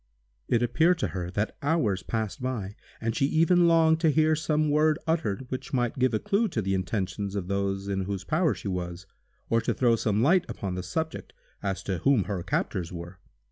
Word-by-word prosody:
It 120 0 +2
appeared 160 +9 +3
to 105 - -1
her 90 +1 -4
that 105 +4 -2
hours 140 - +1
passed 110 0 -3
by, 110 -6 -3 0.2
and 115 0 -2
she 135 - +2
even 170 +3 +4
longed 165 -1 +4
to 165 -1 +3
hear 155 +1 +3
some 155 -1 +1
word 155 +1 +3
uttered 150 -8 -1
which 130 - -5
might 120 0 0
give 125 -3 +2
a - - +3
clue 200 - +1
to 165 - -3
the 95 +1 0
intentions 95 +2 -2
of 95 -3 -3
those 100 0 -1
in 95 -1 -1
whose 100 -1 -4
power 155 - +1
she - - -7
was, 90 -2 -4 0.4
or 115 0 +2
to - - -1
throw 120 -3 +3
some 110 -1 +1
light 180 +5 +4
upon 95 -2 -4
the 90 - -3
subject, 160 - -4 0.3
as 95 -1 -3
to 95 -3 -2
whom 135 -3 +3
her 95 0 -3
captors 85 0 -2
were. 85 +1 -8
115 Hz, 205 wpm, -27 LUFS, 95-155 Hz, 0.4 s, even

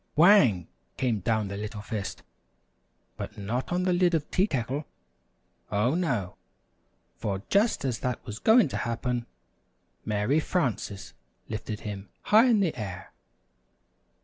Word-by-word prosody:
Wang! 145 - +6 0.3
came 120 -5 +1
down 110 +2 0
the 100 - -5
little 105 0 -5
fist, 105 -1 -5 0.9
but 115 - -6
not 115 - -3
on 180 +1 +1
the 180 -1 +2
lid 175 -1 +3
of 150 -2 -2
Tea 190 +3 +3
Kettle. 135 - -2 0.8
Oh, 105 +6 +2
no; 125 - -1 0.8
for 100 -3 -3
just 205 -6 +2
as 125 -3 -1
that 125 -2 -3
was 105 +2 -6
going 220 -3 +6
to - - -3
happen, 120 +1 -2 0.8
Mary 105 +8 +1
Frances 125 - -2 0.4
lifted 110 0 -5
him 100 -3 -6
high 220 +4 +6
in 225 -4 +4
the 180 -5 +1
air. 95 -5 -7
120 Hz, 135 wpm, -28 LUFS, 105-170 Hz, 0.9 s, Wang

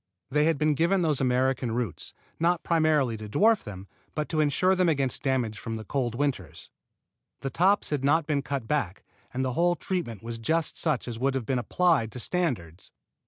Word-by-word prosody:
They 150 +2 +3
had 160 -2 +2
been 150 +1 +2
given 170 +5 +2
those 150 -5 +1
Americana 130 -1 +1
roots, 115 -7 -4 0.2
not 170 +1 +1
primarily 155 -8 +2
to 105 -1 -8
dwarf 220 - +3
them, 100 -2 -8 0.3
but 150 -1 -2
to 155 - -1
insure 155 +5 +3
them 185 -2 +2
against 135 -5 0
damage 125 -6 -1
from 115 -1 -5
the 110 -1 -7
cold 120 -1 -2
winters. 130 - -3 0.7
The 135 - -3
tops 190 +4 +2
had 145 -3 -1
not 150 +3 +3
been 145 -2 0
cut 140 -5 -4
back, 115 -11 -1 0.3
and 130 +1 -2
the 130 - -1
whole 175 +4 +2
treatment 155 - -4
was 115 0 -5
just 160 +7 0
such 150 -8 0
as 115 -2 -5
would 135 +1 +1
have 130 -4 -2
been 130 +2 0
applied 125 -2 +1
to 125 - -6
standards. 115 - -2
135 Hz, 195 wpm, -27 LUFS, 120-160 Hz, 0.7 s, They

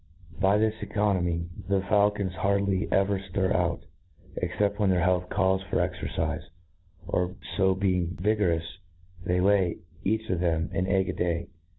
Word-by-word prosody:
By 100 +1 +4
this 110 0 +2
tKconomy, 95 -5 0 0.2
the 100 -1 +2
faulcons 100 -1 +2
hardly 100 0 0
ever 100 0 +2
ftir 95 -1 -1
out, - - 0 0.5
except 105 0 -1
when 100 -2 +3
their 90 -2 +2
health 90 -1 +1
calls 95 -1 +2
for 100 - -5
exercife; - - -1 0.7
and 90 +1 0 0.2
fo 95 -1 +3
being 90 -2 0
vigorous, 90 -4 0 0.4
they 90 +1 +1
lay, 95 -1 +3 0.3
each 110 +2 0
of 90 - 0
thcm^ 85 -2 0
an 95 - 0
egg 95 -1 +1
a - - -1
day. 85 -1 -1
95 Hz, 150 wpm, -27 LUFS, 90-100 Hz, 0.7 s, By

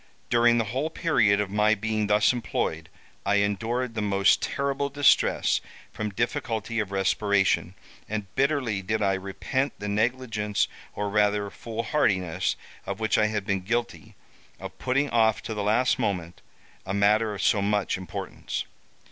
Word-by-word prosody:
During 120 0 +5
the 115 - +2
whole 140 +5 -1
period 120 -12 +2
of 100 -2 -2
my 105 +1 +3
being 110 0 -1
thus 105 +3 +4
employed, 120 -2 -3 0.3
I 100 +1 +2
endured 115 +5 0
the 110 - -2
most 100 -2 +3
terrible 140 0 -1
distress 140 -1 +3 0.3
from 105 0 -3
difficulty 115 +1 -2
of 100 -3 -2
respiration, 95 -1 +1 0.3
and 110 -1 -2
bitterly 135 -7 +1
did 110 +3 -1
I 95 -1 +2
repent 100 +8 -2
the 100 - -5
negligence 110 -1 0 0.3
or 105 - -2
rather 105 0 +1
fool 115 0 -5
hardiness, 95 - +1 0.3
of - - -4
which 110 -1 +1
I 110 - +4
had 105 -2 -2
been 100 -2 0
guilty, 120 +5 -3 0.4
of - - -8
putting 140 +3 0
off 110 -2 +3
to 110 - -4
the 105 - -3
last 120 +6 +2
moment 90 -7 -2 0.4
a 95 - -3
matter 105 +1 +3
of - - -4
so 105 - +3
much 100 -1 0
importance. 95 -2 -5
105 Hz, 155 wpm, -26 LUFS, 100-120 Hz, 0.4 s, During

